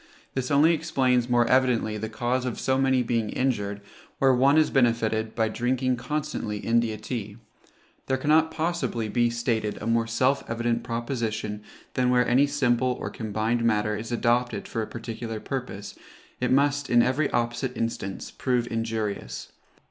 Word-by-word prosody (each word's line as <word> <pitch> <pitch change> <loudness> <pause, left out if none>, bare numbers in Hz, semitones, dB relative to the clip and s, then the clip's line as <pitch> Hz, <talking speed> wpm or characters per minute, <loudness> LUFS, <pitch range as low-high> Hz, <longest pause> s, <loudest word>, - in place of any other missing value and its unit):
This 130 -1 -2
only 150 +4 +5
explains 130 -6 +1
more 120 -1 +3
evidently 125 -4 +2
the 110 +1 -4
cause 125 +3 -1
of 125 -2 -3
so 130 - +1
many 130 -2 +3
being 115 -2 0
injured, 105 -6 -1 0.4
where 135 -1 +4
one 135 +4 +4
is 155 - +4
benefited, 115 -3 +1
by 110 -2 +2
drinking 125 +3 0
constantly 135 -5 -3
India 115 0 +1
tea. 110 -1 -5 0.7
There 130 - +1
cannot 155 +4 +3
possibly 160 -9 -2
be 120 +2 +2
stated 115 -3 -1
a - - -6
more 115 0 +1
self 130 +4 +1
evident 115 0 0
proposition 115 -3 -3 0.3
than 125 -1 +1
where 125 -1 +3
any 135 +4 +4
simple 130 -3 +1
or - - -4
combined 110 +1 -1
matter 105 -2 +1
is 110 +3 -6
adopted 120 +1 0
for 115 - -3
a 110 - -3
particular 115 -1 -6
purpose, 125 -6 -5 0.5
it 125 - 0
must, 140 0 +2
in 120 -1 +5
every 135 +4 +1
opposite 120 +2 -1
instance, 105 -4 -3
prove 125 -2 0
injurious. 110 - -3
120 Hz, 155 wpm, -26 LUFS, 110-130 Hz, 0.7 s, only